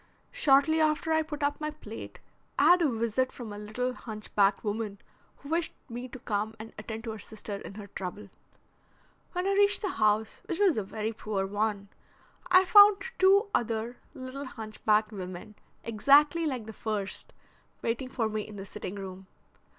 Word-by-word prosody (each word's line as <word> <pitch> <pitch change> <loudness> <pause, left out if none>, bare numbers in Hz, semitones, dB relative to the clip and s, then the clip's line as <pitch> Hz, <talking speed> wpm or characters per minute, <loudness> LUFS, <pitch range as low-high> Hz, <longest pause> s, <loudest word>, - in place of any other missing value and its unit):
Shortly 315 - +4
after 310 +1 +2
I 315 - +4
put 295 -2 -5
up 290 +1 0
my 305 - -1
plate 225 -8 -9 0.4
I 295 - +5
had 355 0 +6
a 315 - +4
visit 235 +2 0
from 225 -4 -8
a - - -7
little 245 +5 -2
hunch 215 -3 -8
backed 200 -1 +3
woman 210 -1 -3 0.4
who 280 - -12
wished 330 +1 0
me 240 +2 -5
to 255 - -9
come 215 -2 -2
and 225 +1 -9
attend 220 +1 -6
to 230 - -4
her 220 - -7
sister 205 -1 -6
in 200 - -9
her 210 -1 -7
trouble. 200 +1 -7 1.0
When 360 0 -1
I - - +2
reached 405 +1 +3
the 400 - 0
house, 215 -4 +1
which 345 - -3
was 390 -4 +4
a 215 - -1
very 215 +3 -3
poor 210 -3 -2
one, 205 0 -1 0.6
I 370 +1 +7
found 405 +1 +8 0.2
two 395 +3 +5
other 230 +1 -1 0.2
little 265 +1 -6
hunched 220 -4 -9
backed 215 0 +4
women, 185 0 -7 0.3
exactly 290 +8 +4
like 255 -6 -3
the 220 - -8
first, 205 -2 -4 0.5
waiting 235 +3 -1
for 230 -3 -1
me 215 0 -2
in 210 0 -9
the 195 -1 -7
sitting 195 0 -6
room. 190 -1 -8
225 Hz, 180 wpm, -29 LUFS, 210-295 Hz, 1.0 s, found